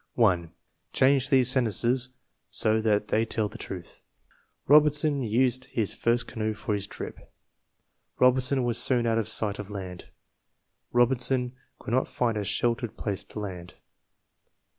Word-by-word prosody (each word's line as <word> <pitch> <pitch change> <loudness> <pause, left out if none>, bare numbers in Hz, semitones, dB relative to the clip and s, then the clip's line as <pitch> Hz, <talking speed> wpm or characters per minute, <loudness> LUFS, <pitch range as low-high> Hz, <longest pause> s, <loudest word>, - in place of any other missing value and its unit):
1. 90 -8 +2 0.4
Change 135 0 +3
these 130 -4 +4
sentences 125 +1 +2 0.4
so 110 0 +3
that 105 -1 0
they 110 - +2
tell 110 -1 -2
the 110 +3 -11
truth: 90 -4 -9 0.6
Robinson 150 0 +4
used 125 +2 +1
his 115 -6 -1
first 120 +1 0
canoe 110 -2 -3
for 105 0 -3
his 100 -1 -2
trip. - - -9 0.9
Robinson 130 +1 +3
was 120 -1 0
soon 125 -3 +1
out 115 -1 +1
of 110 - -2
sight 105 -2 -1
of 105 -1 -7
land. 95 -3 -8 0.8
Robinson 125 +1 +1 0.2
could 115 - -6
not 130 - +1
find 120 -3 -1
a 105 - -2
sheltered 115 +2 -1
place 100 -3 -3
to - - -8
land. 90 -4 -7
115 Hz, 140 wpm, -27 LUFS, 105-130 Hz, 0.9 s, these